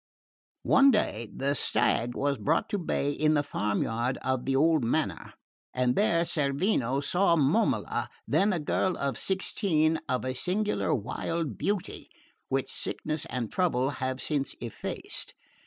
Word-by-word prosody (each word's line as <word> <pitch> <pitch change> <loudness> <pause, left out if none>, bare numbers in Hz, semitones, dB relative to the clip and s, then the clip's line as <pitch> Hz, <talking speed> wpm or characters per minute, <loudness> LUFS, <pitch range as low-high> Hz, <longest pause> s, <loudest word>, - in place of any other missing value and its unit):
One 275 +1 +6
day 115 - 0
the 140 +1 -1
stag 120 -3 +1
was 140 -3 0
brought 105 - +1
to 205 -2 -1
bay 145 -4 -1
in 155 +1 +2
the 145 - +2
farm 105 -7 -1
yard 120 +3 -1
of 130 -1 -1
the 135 0 +1
old 155 0 +3
manor, 140 +7 -1 0.4
and 125 -1 +2
there 170 -5 +3
Cerveno 140 - 0
saw 175 +4 +3
Momola, 160 +9 +1 0.2
then 205 +2 +3
a 180 - 0
girl 180 +4 0
of 140 -3 -1
sixteen, 165 - +1
of 130 0 0
a 130 - -1
singular 195 +10 0
wild 140 +4 -2
beauty 200 - -3 0.4
which - - 0
sickness 155 -1 -3
and 120 -4 -3
trouble 140 -8 +1
have 130 0 -2
since 140 0 -1
effaced. 115 -2 -5
145 Hz, 145 wpm, -28 LUFS, 130-175 Hz, 0.4 s, One